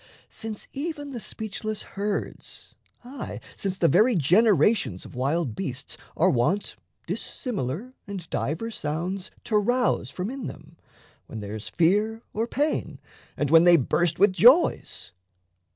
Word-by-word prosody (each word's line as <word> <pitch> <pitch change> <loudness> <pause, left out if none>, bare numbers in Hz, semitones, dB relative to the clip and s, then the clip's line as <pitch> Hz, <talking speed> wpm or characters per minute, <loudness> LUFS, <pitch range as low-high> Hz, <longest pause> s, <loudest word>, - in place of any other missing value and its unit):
since 220 -2 -6
even 290 -1 -4
the 245 - -5
speechless 215 -1 -4
herds, 200 0 -5 0.3
aye, 250 +1 -7 0.2
since 195 -1 -2
The 170 - +3
very 215 +9 +4
generations 180 - +3
of - - -11
wild 135 +1 0
beasts 135 -8 -4 0.2
Are - - +4
wont 135 +12 0 0.3
dissimilar 215 - -4
and 190 -4 -6
divers 195 +11 -2
sounds 175 +6 -3
To 215 - +1
rouse 245 +4 +1
from 190 +5 -4
in 270 -3 -5
them, 155 +2 -11 0.5
when 110 - -7
there's 105 +1 -6
fear 210 +7 +2
or 225 +2 -1
pain, 295 +5 -1 0.4
And 145 -1 0
when 165 0 +8
they 175 -1 +7
burst 170 +4 +1
with 195 -1 +5
joys. 255 - +4
195 Hz, 135 wpm, -26 LUFS, 160-225 Hz, 0.5 s, when